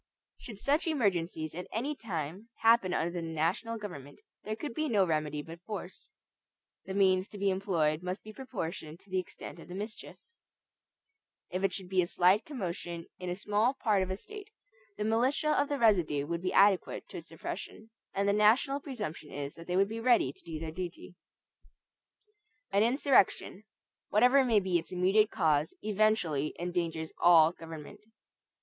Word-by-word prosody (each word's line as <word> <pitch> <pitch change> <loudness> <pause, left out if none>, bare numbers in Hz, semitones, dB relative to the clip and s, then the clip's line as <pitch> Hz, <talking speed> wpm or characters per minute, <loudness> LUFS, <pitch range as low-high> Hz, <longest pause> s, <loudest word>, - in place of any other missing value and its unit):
Should 220 -4 -9
such 290 - +1
emergencies 175 - 0
at 180 +2 -6
any 275 +7 -2
time 185 - -5
happen 225 -5 +5
under 170 -1 0
the 175 -1 -4
national 165 +8 -1
government, 145 -10 -9 0.2
there 215 +1 -3
could 290 +2 -6
be 310 +3 -1
no 200 -4 +4
remedy 150 -3 -1
but 165 +2 -11
force. 190 -2 -8 0.8
The 190 0 -5
means 190 -1 +3
to 210 - -10
be 200 0 +1
employed 170 -5 0
must 180 +2 -4
be 215 - -10
proportioned 175 - -6
to 200 - -22
the 185 - +1
extent 175 -1 -8
of - - -12
the 180 - -8
mischief. 210 +3 -7 1.4
If 185 +2 -2
it 195 - +3
should 185 0 -7
be 185 0 +2
a 175 - -1
slight 185 +5 +3
commotion 175 - -5
in 180 -1 -4
a 175 - -2
small 210 +6 +1
part 210 -6 +2
of 185 - -2
a 190 - -2
State, 420 - -10 0.5
the - - -2
militia 245 +8 +1
of 285 -1 +2
the 290 - 0
residue 175 - +3
would 170 +2 -3
be 185 - -1
adequate 200 -1 +3
to - - -7
its - - -9
suppression; 220 +1 -7 0.2
and 200 +1 0
the 200 - +4
national 230 +7 +4
presumption 210 - -6
is 140 0 -5
that 165 - -12
they 180 0 0
would 195 +1 +4
be 225 +2 -5
ready 230 - +3
to - - -24
do 165 -2 -6
their 160 0 -5
duty. 175 +1 -7 1.6
An 200 +1 +3
insurrection, 235 -4 +2 0.4
whatever 250 +6 +5
may 230 -4 +4
be 185 -3 +1
its 165 - -11
immediate 190 +4 +3
cause, 155 -6 +1
eventually 205 -9 +1
endangers 170 -2 -3
all 165 -2 +7
government. 165 0 -10
190 Hz, 175 wpm, -31 LUFS, 170-220 Hz, 1.6 s, all